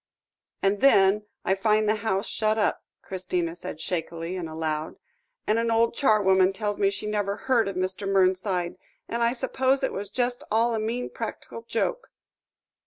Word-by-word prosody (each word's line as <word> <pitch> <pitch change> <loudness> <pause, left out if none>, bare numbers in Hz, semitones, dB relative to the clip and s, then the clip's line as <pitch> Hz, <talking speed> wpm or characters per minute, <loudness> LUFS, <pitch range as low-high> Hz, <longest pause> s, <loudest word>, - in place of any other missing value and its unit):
"And 195 +1 +2
then 210 -5 +5 0.2
I 190 - +3
find 215 +2 +2
the 215 +1 +2
house 205 -2 -1
shut 215 0 0
up," 215 - 0 0.2
Christina 180 -3 -2
said 165 -2 -7
shakily, 170 0 -3
and 175 -3 -4
aloud, 155 -1 -3 0.5
"and 215 +2 +2
an 230 0 0
old 230 0 +3
charwoman 195 -6 +4
tells 205 0 -3
me 195 - +4
she 200 +2 -5
never 205 -1 -1
heard 240 -4 +1
of 195 - -4
Mr. 185 +2 -2
Mernside; 185 -2 +1 0.3
and 235 - -3
I 235 +1 +3
suppose 260 +1 +1
it - - 0
was 200 +1 -5
just 245 -1 -1
all 230 +2 +2
a 225 - 0
mean 230 +3 -3
practical 230 0 -6
joke." 345 - -2
205 Hz, 170 wpm, -26 LUFS, 185-230 Hz, 0.5 s, then